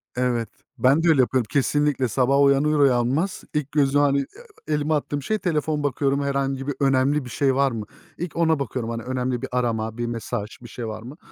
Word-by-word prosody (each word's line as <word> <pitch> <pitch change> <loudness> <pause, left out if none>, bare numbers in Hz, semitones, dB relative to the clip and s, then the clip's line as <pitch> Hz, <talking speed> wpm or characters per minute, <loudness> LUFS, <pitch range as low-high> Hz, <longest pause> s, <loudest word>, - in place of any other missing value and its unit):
Evet. 125 -2 0 0.3
Ben 140 +6 +3
de - - +2
öyle 140 -5 +5
yapıyorum, 125 -2 +1
kesinlikle. 145 -2 +1
Sabah 135 +4 +2
uyanır 140 +2 +3
uyanmaz 135 +7 +2
ilk 150 -2 -2
gözüm 145 -1 +3
hani, 140 -1 +3
eee, 140 - -2 0.5
elimi 150 +1 0
attığım 145 -1 -1
şey 215 +9 -1
telefon 155 -3 -1
bakıyorum, 140 0 0
herhangi 135 -1 -1
bir 145 - -2
önemli 135 +1 +2
bir - - -8
şey 135 +1 +1
var 135 -1 +2
mı? 110 -2 -5 0.3
İlk 175 0 -5
ona 160 -3 +2
bakıyorum. 125 -3 -3
Hani, 115 -1 -4
önemli 125 -1 -2
bir - - -5
arama, 115 -2 -1
bir 120 - -2
mesaj, 115 -2 -4
bir 120 - -10
şey 115 0 -6
var 110 0 -6
mı? 130 +7 -10
135 Hz, 200 wpm, -23 LUFS, 125-145 Hz, 0.5 s, öyle